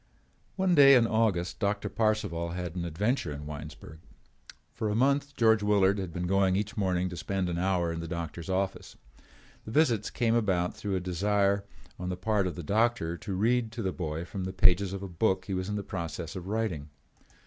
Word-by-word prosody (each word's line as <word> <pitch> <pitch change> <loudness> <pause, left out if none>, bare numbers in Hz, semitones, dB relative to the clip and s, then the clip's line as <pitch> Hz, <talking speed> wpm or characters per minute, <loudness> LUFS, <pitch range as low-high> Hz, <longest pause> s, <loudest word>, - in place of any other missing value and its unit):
One 190 -2 +2
day 140 -3 +8
in 120 -2 +5
August 110 -6 0
Doctor 100 0 0
Parcival 100 -5 -1
had 90 -1 -5
an 85 -1 -3
adventure 90 - -1
in 75 +1 -7
Winesburg. 75 +1 -9 0.7
For 110 -2 -2
a 105 - 0
month 140 +3 +1
George 110 -2 +4
Willard 100 -1 +3
had 95 -3 -4
been 90 +2 -3
going 95 0 +2
each 105 +4 -2
morning 95 -4 0
to 90 - -7
spend 90 +4 -2
an 85 0 -2
hour 90 -2 +1
in 85 - -4
the 85 - -5
doctor's 85 0 -5
office. 95 +1 -2 0.7
The - - -9
visits 115 -5 +2
came 115 -3 +1
about 95 -6 +1
through 100 -2 -3
a - - +1
desire 100 +2 +1 0.3
on 90 0 -3
the 90 - -3
part 100 0 +1
of 90 - -4
the 85 - -6
doctor 105 -2 +1
to 95 +2 -5
read 115 +3 +1
to 115 -1 -4
the 95 -1 -1
boy 80 -2 -4
from 95 0 -5
the 95 - -4
pages 95 0 +4
of 100 0 -5
a - - -4
book 95 +1 0
he 95 - -4
was 95 +1 -2
in 105 - -2
the 100 - -3
process 85 -1 -5
of 90 -1 -6
writing. 100 -9 -2
95 Hz, 205 wpm, -29 LUFS, 90-110 Hz, 0.7 s, day